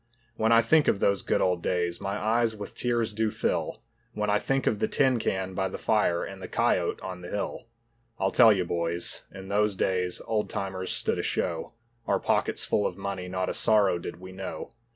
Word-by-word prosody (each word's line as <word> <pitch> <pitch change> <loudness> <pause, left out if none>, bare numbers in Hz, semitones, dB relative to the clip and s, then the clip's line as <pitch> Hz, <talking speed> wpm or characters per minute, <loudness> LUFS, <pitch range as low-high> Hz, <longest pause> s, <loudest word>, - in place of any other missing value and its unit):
When 110 +1 +1
I 115 0 +6
think 155 +6 +4
of - - +3
those 100 -1 +2
good - - 0
old 90 -2 +1
days, 85 -1 -1
my 100 +1 -2
eyes 110 +1 +1
with 105 -1 -8
tears 120 -3 0
do 110 +1 +1
fill; - - -2 0.3
When 105 -1 -1
I 105 - +3
think 135 +3 0
of 105 - +1
the - - +1
tin 130 -4 +2
can 95 -3 -2
by 95 0 -1
the - - -6
fire 105 -6 +1
and 95 -1 -8
the 90 - -6
cayote - - +1
on 90 -1 -6
the 90 - -8
hill. 105 +2 -4 0.5
I'll 95 - 0
tell 115 -3 +7
you, 95 -4 +1
boys, 85 0 0
in 95 0 -10
those 105 0 +2
days 90 -1 0
old 110 -2 -1
timers 95 -1 -4
stood - - -1
a - - +1
show, 85 +2 -2 0.3
Our - - +2
pockets - - 0
full 105 - +1
of 90 - -7
money, 95 -2 -4
not 95 0 -2
a - - -1
sorrow 105 -5 +3
did 85 - -7
we 95 0 -10
know. 95 +3 -7
100 Hz, 215 wpm, -27 LUFS, 90-110 Hz, 0.5 s, tell